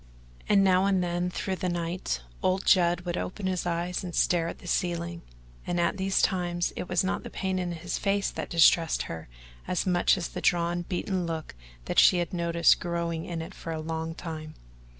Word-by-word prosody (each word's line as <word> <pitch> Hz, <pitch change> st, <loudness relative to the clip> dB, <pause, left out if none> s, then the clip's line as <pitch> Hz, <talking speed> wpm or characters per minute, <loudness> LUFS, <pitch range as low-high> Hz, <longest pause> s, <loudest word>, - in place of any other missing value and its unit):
And 200 Hz, -1 st, +5 dB
now 190 Hz, 0 st, +4 dB
and 190 Hz, -2 st, +2 dB
then 175 Hz, 0 st, -1 dB
through 190 Hz, +1 st, -3 dB
the 180 Hz, -, -1 dB
night 170 Hz, -, -2 dB, 0.2 s
old 185 Hz, +1 st, +1 dB
Judd 175 Hz, -2 st, +4 dB
would 175 Hz, -1 st, -3 dB
open 190 Hz, +2 st, -5 dB
his 185 Hz, -1 st, -1 dB
eyes 175 Hz, +2 st, -2 dB
and 175 Hz, -2 st, -5 dB
stare 170 Hz, -2 st, +2 dB
at -, -, -5 dB
the -, -, -15 dB
ceiling, 170 Hz, -1 st, -1 dB, 0.5 s
and 175 Hz, -, 0 dB
at 170 Hz, +3 st, +1 dB
these 190 Hz, 0 st, +1 dB
times 175 Hz, -2 st, 0 dB
it 180 Hz, -, -5 dB
was 180 Hz, -1 st, +2 dB
not 190 Hz, -, -1 dB
the -, -, -8 dB
pain 190 Hz, -1 st, -2 dB
in 180 Hz, -1 st, -2 dB
his 160 Hz, -, -4 dB
face 200 Hz, 0 st, 0 dB
that -, -, -5 dB
distressed 165 Hz, -1 st, +4 dB
her 80 Hz, -5 st, -7 dB, 0.4 s
as 180 Hz, -, 0 dB
much 180 Hz, 0 st, +3 dB
as 170 Hz, -, -3 dB
the -, -, -6 dB
drawn 175 Hz, -1 st, +1 dB
beaten 180 Hz, 0 st, -2 dB
look 160 Hz, -1 st, -4 dB, 0.3 s
that -, -, +2 dB
she 180 Hz, -, +7 dB
had 175 Hz, +2 st, -2 dB
noticed 170 Hz, -1 st, +3 dB
growing 170 Hz, -2 st, -2 dB
in 165 Hz, -2 st, -4 dB
it -, -, -9 dB
for 165 Hz, -, -7 dB
a 160 Hz, -, -3 dB
long 160 Hz, +1 st, -4 dB
time. 155 Hz, -3 st, -7 dB
175 Hz, 205 wpm, -28 LUFS, 170-185 Hz, 0.5 s, she